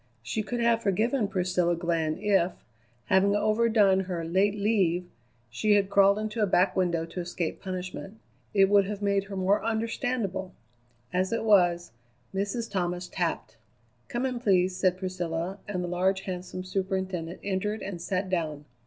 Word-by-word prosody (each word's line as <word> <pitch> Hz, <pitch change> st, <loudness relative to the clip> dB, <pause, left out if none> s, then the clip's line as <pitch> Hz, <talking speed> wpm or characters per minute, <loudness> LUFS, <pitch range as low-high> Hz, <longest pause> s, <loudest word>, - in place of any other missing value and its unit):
She 125 Hz, -, -2 dB
could 240 Hz, +3 st, -4 dB
have 235 Hz, -1 st, +3 dB
forgiven 220 Hz, +4 st, +1 dB
Priscilla 180 Hz, -2 st, +1 dB
Glenn 165 Hz, -2 st, -1 dB
if, 190 Hz, -3 st, +2 dB, 0.5 s
having 195 Hz, +2 st, +3 dB
overdone 215 Hz, -2 st, +3 dB
her 175 Hz, -3 st, -3 dB
"late 190 Hz, +5 st, +2 dB
leave," 195 Hz, -4 st, +1 dB, 0.5 s
she 210 Hz, -, +2 dB
had 200 Hz, -1 st, +1 dB
crawled 200 Hz, 0 st, +5 dB
into 215 Hz, +1 st, -3 dB
a 210 Hz, -, +3 dB
back 185 Hz, +1 st, +3 dB
window 170 Hz, -3 st, +1 dB
to 165 Hz, +2 st, -7 dB
escape 175 Hz, -1 st, -3 dB
punishment. 185 Hz, +2 st, -6 dB, 0.3 s
It 195 Hz, -1 st, +5 dB
would 200 Hz, 0 st, +5 dB
have 205 Hz, 0 st, -5 dB
made 200 Hz, -1 st, +1 dB
her 200 Hz, 0 st, -7 dB
more 190 Hz, +2 st, +2 dB
understandable. 225 Hz, -4 st, -2 dB, 0.6 s
As 185 Hz, +1 st, +1 dB
it 230 Hz, -, -1 dB
was, 175 Hz, -, +3 dB, 0.4 s
Mrs. 205 Hz, +4 st, -2 dB
Thomas 180 Hz, -2 st, -2 dB
tapped! -, -, -3 dB, 0.5 s
"Come 240 Hz, +1 st, -2 dB
in, 250 Hz, -2 st, -2 dB
please," 185 Hz, -5 st, +2 dB
said 185 Hz, -1 st, +2 dB
Priscilla, 185 Hz, 0 st, -3 dB
and 185 Hz, -3 st, -2 dB
the -, -, -3 dB
large, 190 Hz, +2 st, +1 dB
handsome 185 Hz, -1 st, -5 dB
superintendent 185 Hz, -2 st, -3 dB
entered 205 Hz, +2 st, -2 dB
and 180 Hz, -4 st, -5 dB
sat 190 Hz, +2 st, -1 dB
down. 155 Hz, -5 st, -2 dB
190 Hz, 155 wpm, -28 LUFS, 180-205 Hz, 0.6 s, crawled